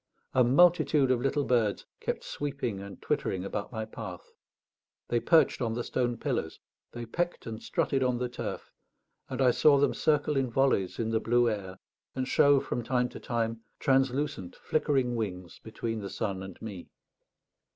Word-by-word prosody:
A 130 - +5
multitude 145 0 +4
of 125 -2 +2
little 135 +2 +1
birds 115 -6 +1
kept - - -3
sweeping 135 -8 -3
and 100 0 -9
twittering 95 0 -1
about 100 +1 -4
my 110 -2 -3
path; 110 - -9 0.8
they 120 - +2
perched 160 0 +3
on 115 -2 -1
the 120 - -2
stone 120 -1 -1
pillars, 120 - -2 0.3
they 120 0 -6
pecked 175 +9 -2
and 110 -1 -6
strutted 135 - 0
on 125 -1 +1
the 125 0 -1
turf, 120 - -6 0.6
and 135 - 0
I 125 - +6
saw 145 +3 +5
them 145 - +3
circle 150 -1 +1
in 135 -2 +1
volleys 120 -7 +1
in 115 -1 -1
the 110 - +2
blue 120 +2 +3
air, 95 -3 -5 0.4
and 130 -1 -2
show, 140 +1 +5
from 125 - -3
time 125 +1 +1
to - - -9
time, 115 -1 -2 0.2
translucent 135 -7 0
flickering 135 -5 0
wings 90 -6 -4
between 115 0 -4
the 100 -2 -5
sun 100 -4 -3
and 95 -2 -9
me. 100 -5 -7
120 Hz, 170 wpm, -29 LUFS, 110-135 Hz, 0.8 s, I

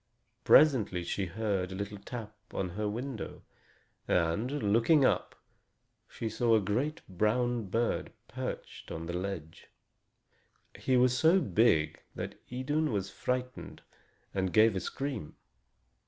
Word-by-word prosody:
Presently 110 - +5
she 95 +2 -2
heard 95 -1 -1
a - - -5
little 100 +1 -5
tap 110 +1 -7 0.2
on 95 - -1
her 105 +4 -2
window, 120 +1 -5 0.6
and, 90 +8 +1 0.2
looking 130 +6 +5
up, - - +1 0.7
she 115 - -4
saw 115 +1 +2
a - - +5
great 120 +10 -1
brown 110 +4 0
bird 115 +5 -1 0.2
perching - - -6
on 80 0 -5
the 85 - -4
ledge. 90 -3 -5 1.1
He 130 -1 +1
was 125 0 +4
so 160 +9 +5
big 100 - +2
that - - -4 0.2
Idun 145 +4 0
was 100 -2 -2
frightened 125 0 -4 0.5
and 95 -2 0
gave 110 +3 +5
a - - 0
scream. 125 - -4
110 Hz, 125 wpm, -31 LUFS, 95-125 Hz, 1.1 s, Presently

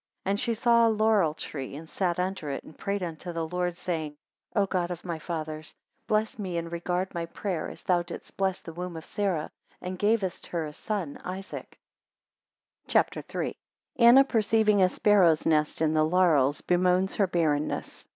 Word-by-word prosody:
9 195 - +1
And 200 - 0
she 230 0 0
saw 235 0 +4
a - - +4
laurel 215 -7 +3
tree 135 -4 -6
and 160 +2 -9
sat 175 0 -1
under 180 -4 -2
it, 135 - -4
and 155 - -14
prayed 200 -1 -2
unto 170 +1 -5
the 165 -1 -3
Lord, 180 0 -1
saying, 160 -5 -3 0.4
10 205 - +4
O - - +1
God 180 -2 -1
of 175 0 -6
my 170 -3 -3
fathers, 155 -1 -5 0.3
bless 215 +1 0
me 185 -4 -3
and 170 0 -4
regard 180 +2 -2
my 170 -1 -3
prayer, 175 -1 -3
as - - -10
thou 180 -1 +2
didst 170 0 -9
bless 190 -1 0
the 165 - -9
womb 180 0 -5
of 160 - -8
Sarah; 190 -7 -1 0.3
and 180 0 -6
gavest 205 -3 0
her 170 -2 -2
a 150 - -7
son 190 -5 -4
Isaac. 190 +2 -7 1.1
CHAPTER - - +2
III. - - -3 0.4
1 235 -2 +6
Anna 260 +3 +9
perceiving 220 -4 +3
a 185 - +5
sparrow's 180 -6 +4
nest 155 0 +2
in 155 0 +2
the 155 0 +3
laurels 155 -5 +3
bemoans 180 +1 +2
her 200 - +3
barrenness. 155 -4 -1
180 Hz, 190 wpm, -28 LUFS, 160-200 Hz, 1.1 s, Anna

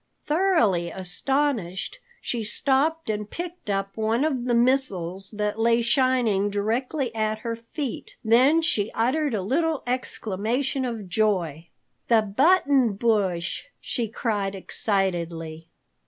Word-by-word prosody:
Thoroughly 295 - +2
astonished, 200 - -2 0.2
she 235 -2 -3
stopped 280 +9 +1
and 210 -1 -3
picked 345 -7 -7
up 195 0 -2
one 225 +4 +1
of 260 -6 -1
the 245 -1 +2
missiles 195 -8 +1
that 210 +1 -1
lay 230 +1 +3
shining 240 -6 +2
directly 230 +6 -1
at 215 -1 -1
her 230 0 -1
feet. 235 +4 -6
Then 260 +9 +5
she 220 -11 +2
uttered 265 +3 +1
a 195 - -2
little 315 - 0
exclamation 245 +2 -2
of 225 -5 -4
joy: 175 -6 0 0.4
"The 225 -2 +4
Button 270 - +3
Bush!" 200 - 0
she 235 -3 -2
cried 205 -3 -2
excitedly. 170 -5 -2
225 Hz, 120 wpm, -25 LUFS, 195-265 Hz, 0.4 s, Then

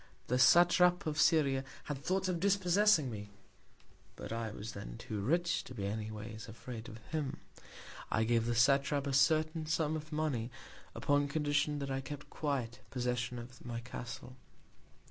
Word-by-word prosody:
The 125 +1 +2
Satrap 175 +4 +6
of 155 0 +1
Syria 140 -5 +4 0.2
had 145 -3 -4
Thoughts 185 +7 0
of 180 -2 -1
dispossessing 190 - +4
me; 105 -1 -7 0.9
but - - -6
I 115 -1 -2
was 105 +1 -6
then 80 -13 -8
too 105 -2 -5
rich 170 - +1
to 130 - -9
be 100 -3 -3
any 105 +2 -3
Ways 110 +1 -7
afraid 115 0 -8
of 110 - -9
him; 150 -4 -2 0.7
I 110 - +2
gave 115 0 +2
the 120 - +1
Satrap 140 +3 +3
a 140 - -2
certain 155 +3 +3
Sum 160 0 +1
of 155 0 -6
Money, 150 -7 -1 0.5
upon 145 0 +2
Condition 145 0 +1
that 140 -1 -3
I 135 0 -1
kept 145 +2 -8
quiet 130 -6 -2
Possession 125 -1 -2
of 120 +1 -10
my 120 -1 -4
Castle. 120 +1 -7
135 Hz, 165 wpm, -34 LUFS, 120-155 Hz, 0.9 s, Satrap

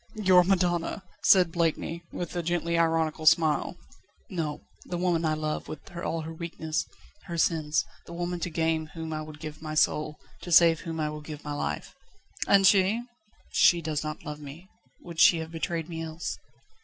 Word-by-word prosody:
"Your 185 -4 +5
madonna!" 175 0 +1 0.2
said 180 -4 +6
Blakeney, 165 0 -1
with 175 0 -5
a 175 - 0
gently 170 0 -1
ironical 160 -1 +1
smile. 155 -1 +4 0.6
"No; 160 -5 -3 0.2
the 175 - -4
woman 175 -2 +1
I 155 -1 +1
love, 155 0 -3
with 155 +3 -9
all 165 -1 -2
her 160 +1 -6
weaknesses, 160 -1 -3
all - - -27 0.3
her 170 - -5
sins; 155 -2 +1 0.2
the - - -8
woman 175 +1 -3
to 175 - -2
gain 160 -1 0
whom 160 -1 -5
I 155 - -3
would 155 -1 -9
give 150 0 -8
my 155 -1 -5
soul, 150 0 +1 0.2
to 175 - -7
save 165 -1 +7
whom 165 -2 -5
I 150 -1 -1
will 150 0 -7
give 150 -1 -8
my 145 - -4
life." 75 - -3 0.5
"And 195 -1 +5
she?" 195 +4 +4 0.5
"She 175 - +5
does 155 -2 -2
not 155 0 -6
love 150 0 -6
me 150 +6 -11 0.3
would 170 -2 -8
she 170 - +7
have 160 0 -5
betrayed 165 0 -3
me 165 -2 -5
else?" 160 +1 -4
165 Hz, 185 wpm, -28 LUFS, 155-175 Hz, 0.6 s, save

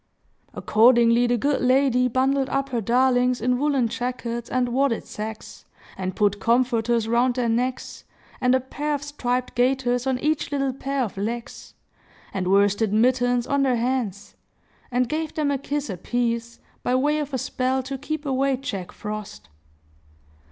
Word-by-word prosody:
Accordingly, 235 +1 +4
the 240 0 +2
good 280 +4 0
lady 255 -1 +3
bundled 265 +2 +1
up 275 +1 -1
her 240 -3 -1
darlings 250 +2 +2
in 250 +2 +1
woollen 280 -4 +2
jackets 235 -1 -4
and 250 -1 0
wadded 260 -1 0
sacks, 215 +1 -8 0.3
and 185 -1 -4
put 205 -1 +1
comforters 235 0 +1
round 240 +2 +2
their 250 -2 0
necks, 250 +3 -2 0.4
and 250 0 +4
a - - +3
pair 295 +3 -3
of 285 - -5
striped 250 -4 -2
gaiters 245 0 +1
on 260 -1 +1
each 300 +2 -1
little 275 -2 0
pair 275 0 -2
of 210 -4 -5
legs, 230 +4 -5 0.6
and 190 -2 -2
worsted 200 +2 +3
mittens 245 +2 +2
on 280 0 +1
their 265 -2 +2
hands, 230 -5 -2 0.5
and 250 0 +1
gave 310 +3 -3
them 300 -2 0
a 275 - -1
kiss 290 +1 -3
apiece, 235 +4 -2 0.2
by 250 - 0
way 295 +4 +2
of 295 -1 -4
a 265 - -1
spell 260 +2 -1
to 270 +2 -5
keep 300 +3 -5
away 270 0 +1
Jack 200 -9 -5
Frost. 210 - -7
250 Hz, 160 wpm, -24 LUFS, 230-270 Hz, 0.6 s, Accordingly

